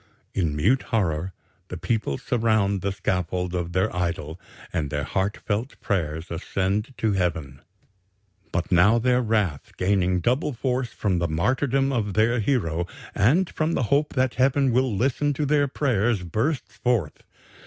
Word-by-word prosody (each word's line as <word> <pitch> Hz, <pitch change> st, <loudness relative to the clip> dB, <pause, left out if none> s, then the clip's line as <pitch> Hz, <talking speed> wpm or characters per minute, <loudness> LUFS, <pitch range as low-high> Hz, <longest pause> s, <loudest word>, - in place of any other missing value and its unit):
In 85 Hz, -6 st, 0 dB
mute 110 Hz, -, +3 dB
horror 90 Hz, -5 st, 0 dB, 0.4 s
the 90 Hz, -, -6 dB
people 105 Hz, -, -1 dB
surround 110 Hz, -5 st, +1 dB
the 100 Hz, -, -1 dB
scaffold 90 Hz, -1 st, -2 dB
of 85 Hz, -1 st, -3 dB
their 95 Hz, +2 st, +1 dB
idol 85 Hz, -2 st, -2 dB, 0.3 s
and 75 Hz, -4 st, -1 dB
their 75 Hz, 0 st, -2 dB
heart 95 Hz, +8 st, -1 dB
felt 110 Hz, +6 st, -3 dB
prayers 80 Hz, -5 st, -2 dB
ascend 100 Hz, +8 st, -2 dB
to 110 Hz, -, +1 dB
Heaven. 80 Hz, -8 st, -2 dB, 0.9 s
"But 85 Hz, +2 st, -2 dB
now 100 Hz, +6 st, +5 dB
their 125 Hz, +1 st, +2 dB
wrath, 105 Hz, -, -1 dB
gaining 95 Hz, -1 st, +2 dB
double 130 Hz, -, 0 dB
force 125 Hz, 0 st, -1 dB
from 95 Hz, -4 st, 0 dB
the 85 Hz, -, 0 dB
martyrdom 130 Hz, -, +1 dB
of 105 Hz, -6 st, -1 dB
their 115 Hz, +3 st, +3 dB
hero 85 Hz, -, 0 dB, 0.3 s
and 150 Hz, -, +3 dB
from 160 Hz, 0 st, -1 dB
the -, -, +1 dB
hope 150 Hz, +2 st, +1 dB
that 130 Hz, -1 st, +2 dB
Heaven 135 Hz, 0 st, +2 dB
will 130 Hz, +1 st, +2 dB
listen 140 Hz, +5 st, +1 dB
to 150 Hz, +2 st, -1 dB
their 145 Hz, 0 st, +3 dB
prayers, 120 Hz, -7 st, 0 dB
bursts 110 Hz, -, -2 dB
forth. 115 Hz, -, 0 dB
105 Hz, 155 wpm, -24 LUFS, 90-125 Hz, 0.9 s, now